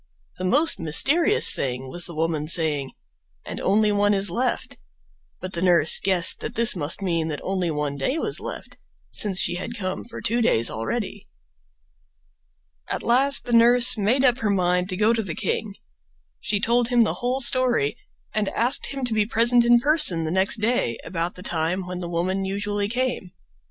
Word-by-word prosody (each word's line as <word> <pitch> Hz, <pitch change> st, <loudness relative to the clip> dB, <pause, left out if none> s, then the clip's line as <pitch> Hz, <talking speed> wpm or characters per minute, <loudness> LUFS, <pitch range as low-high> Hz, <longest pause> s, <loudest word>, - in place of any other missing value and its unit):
The 185 Hz, -, -3 dB
most 285 Hz, -, +3 dB
mysterious 285 Hz, -, +3 dB
thing 130 Hz, 0 st, -4 dB
was 175 Hz, +6 st, -6 dB
the 170 Hz, -, -7 dB
woman 155 Hz, -1 st, -2 dB
saying 155 Hz, -5 st, 0 dB, 0.5 s
"and -, -, -7 dB
only 210 Hz, +2 st, +1 dB
one 205 Hz, 0 st, +1 dB
is 195 Hz, +1 st, +3 dB
left"; 250 Hz, +1 st, -2 dB, 0.6 s
but 185 Hz, 0 st, -8 dB
the 170 Hz, -, -4 dB
nurse 175 Hz, -4 st, +4 dB
guessed 185 Hz, -3 st, +2 dB
that -, -, -6 dB
this 230 Hz, -1 st, +5 dB
must 165 Hz, +3 st, -3 dB
mean 165 Hz, -4 st, -1 dB
that 150 Hz, -2 st, -5 dB
only 185 Hz, -2 st, -2 dB
one 150 Hz, -2 st, -3 dB
day 200 Hz, -, -2 dB
was 425 Hz, +5 st, +1 dB
left, -, -, -9 dB, 0.3 s
since 195 Hz, -3 st, +1 dB
she 175 Hz, 0 st, +1 dB
had 230 Hz, +6 st, -6 dB
come 185 Hz, -3 st, -4 dB
for 235 Hz, -, -10 dB
two 235 Hz, +3 st, -1 dB
days 115 Hz, -, +2 dB
already. 205 Hz, -, -5 dB, 1.6 s
At -, -, -4 dB
last 270 Hz, +4 st, +3 dB
the 240 Hz, -, -4 dB
nurse 240 Hz, +2 st, +5 dB
made 230 Hz, +5 st, 0 dB
up 245 Hz, -2 st, +2 dB
her 215 Hz, -, -1 dB
mind 180 Hz, -1 st, 0 dB
to 185 Hz, -, -4 dB
go 215 Hz, +3 st, +2 dB
to 230 Hz, -, -1 dB
the 180 Hz, -7 st, -6 dB
king. 205 Hz, -3 st, -3 dB, 0.6 s
She 205 Hz, -, -2 dB
told 235 Hz, +3 st, +1 dB
him 240 Hz, -1 st, +3 dB
the 220 Hz, -, -1 dB
whole 250 Hz, +2 st, -1 dB
story 245 Hz, -, +1 dB, 0.4 s
and 215 Hz, -2 st, -1 dB
asked 245 Hz, +5 st, 0 dB
him 270 Hz, -2 st, -5 dB
to 240 Hz, -, -3 dB
be 210 Hz, -1 st, 0 dB
present 235 Hz, +2 st, +3 dB
in 240 Hz, 0 st, +5 dB
person 290 Hz, -, +3 dB
the 160 Hz, -, -3 dB
next 190 Hz, +4 st, +2 dB
day 215 Hz, -, 0 dB
about 170 Hz, 0 st, -4 dB
the 180 Hz, -, -11 dB
time 170 Hz, +3 st, -2 dB
when 180 Hz, 0 st, -6 dB
the 175 Hz, -1 st, -6 dB
woman 185 Hz, +3 st, -2 dB
usually 200 Hz, +1 st, -3 dB
came. 245 Hz, -6 st, -3 dB
200 Hz, 185 wpm, -23 LUFS, 175-240 Hz, 1.6 s, this